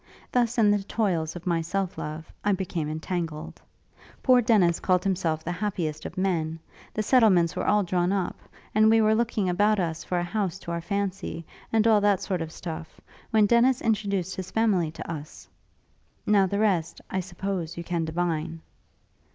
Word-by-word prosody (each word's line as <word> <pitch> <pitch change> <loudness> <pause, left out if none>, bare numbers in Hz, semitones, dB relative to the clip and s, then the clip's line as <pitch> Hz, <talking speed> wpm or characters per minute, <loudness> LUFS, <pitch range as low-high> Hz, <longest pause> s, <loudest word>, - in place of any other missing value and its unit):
Thus, 245 0 +1
in 210 -3 +5
the 205 -1 +2
toils 180 -6 -1
of 175 - -8
my 170 -2 +1
self 190 +3 -2
love, 155 +1 -6
I 205 - +3
became 175 -5 -2
entangled; 160 0 -4 0.6
poor 255 -2 +6
Dennis 200 -7 +3
called 180 -1 +2
himself 170 -5 0
the 175 - -3
happiest 175 -5 -3
of - - -12
men; 165 -4 0 0.3
the 215 - -2
settlements 200 -9 +4
were - - -2
all 210 0 +4
drawn 180 0 0
up; 195 -3 -1 0.3
and 215 +1 +5
we 225 0 +5
were 215 0 +4
looking 220 -3 0
about 205 +4 +2
us 165 -2 -2
for 180 - -2
a 175 - 0
house 190 0 -2
to 170 - -6
our 170 0 -2
fancy, 195 -3 -3 0.3
and 225 -1 +3
all 220 -2 +5
that 205 -2 +3
sort 185 -3 -2
of 160 -1 -4
stuff, 165 -1 -7 0.3
when 215 -2 +4
Dennis 240 +4 +4
introduced 200 -5 -1
his 185 -1 -6
family 205 -8 +2
to 160 - -8
us. 155 -1 -8 0.8
Now 200 -2 +4
the 200 - -2
rest, 180 -6 +1
I 190 - 0
suppose, 180 -2 -4
you 170 - -4
can 170 -1 -1
divine?' 165 -1 -2
185 Hz, 180 wpm, -26 LUFS, 165-210 Hz, 0.8 s, poor